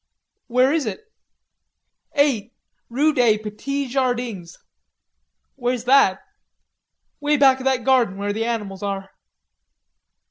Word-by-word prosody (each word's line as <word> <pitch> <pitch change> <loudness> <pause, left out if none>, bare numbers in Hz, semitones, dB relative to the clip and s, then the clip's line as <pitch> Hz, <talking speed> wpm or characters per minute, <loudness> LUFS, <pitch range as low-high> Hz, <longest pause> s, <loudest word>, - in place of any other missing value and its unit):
"Where 255 +3 +3
is 310 -7 0
it." 325 - -5 1.1
"Eight, 260 -6 +1 0.4
rew 290 +6 +2
day 235 -6 +3
Petee 260 +7 -4
Jardings." 245 -9 -2 1.0
"Where's 245 -2 -2
that?" 245 -7 +4 1.0
"Way 295 0 +1
back 265 -2 +5
of 260 - -8
that 260 -2 +1
garden 240 -6 +2
where 205 0 -2
the 225 +2 -2
animals 210 -5 -4
are." 195 -1 -4
245 Hz, 110 wpm, -21 LUFS, 210-270 Hz, 1.1 s, back